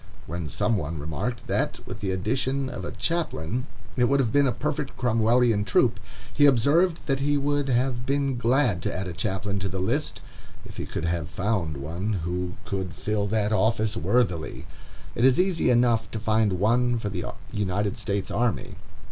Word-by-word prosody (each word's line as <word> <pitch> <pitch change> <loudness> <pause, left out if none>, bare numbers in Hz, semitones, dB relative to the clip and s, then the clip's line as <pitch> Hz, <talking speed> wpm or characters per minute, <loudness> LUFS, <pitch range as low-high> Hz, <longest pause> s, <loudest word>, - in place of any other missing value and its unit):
When 85 -1 -4
some 105 +1 +1
one 80 -2 -3
remarked 80 - -4
that, - - -1
with - - -7
the 100 - -2
addition 130 +8 0
of - - -6
a - - -4
chaplain, 130 - -2 0.3
it 125 - +3
would 140 +3 +3
have 120 -5 +1
been 140 +1 +4
a - - +2
perfect 150 0 -3
Cromwellian 115 -2 +3
troop, 100 - +2 0.3
he 145 -1 +6
observed 150 +7 +3
that 135 -2 0
he 145 +1 +2
would 145 0 0
have 125 0 +1
been 140 0 0
glad 120 - +2
to - - -1
add 95 +2 -3
a 90 - -5
chaplain 100 +2 -2
to 95 0 -2
the 95 - -4
list, 95 0 -1 0.4
if - - -11
he - - -4
could - - -3
have 85 -3 -1
found 95 -7 -1
one 85 +10 -3
who 90 +1 -2
could 95 -3 -3
fill 105 +2 -1
that 105 0 +1
office 110 +1 +2
worthily. 115 -9 0 0.5
It 120 - -1
is 130 +3 +5
easy 180 -2 +2
enough 120 -3 +3
to 110 - -4
find 110 -2 +2
one 120 +6 +2
for 105 -3 -3
the 90 -2 -3 0.3
United 105 +1 -1
States 100 -2 -2
army. 115 -5 -1
110 Hz, 180 wpm, -26 LUFS, 95-130 Hz, 0.5 s, he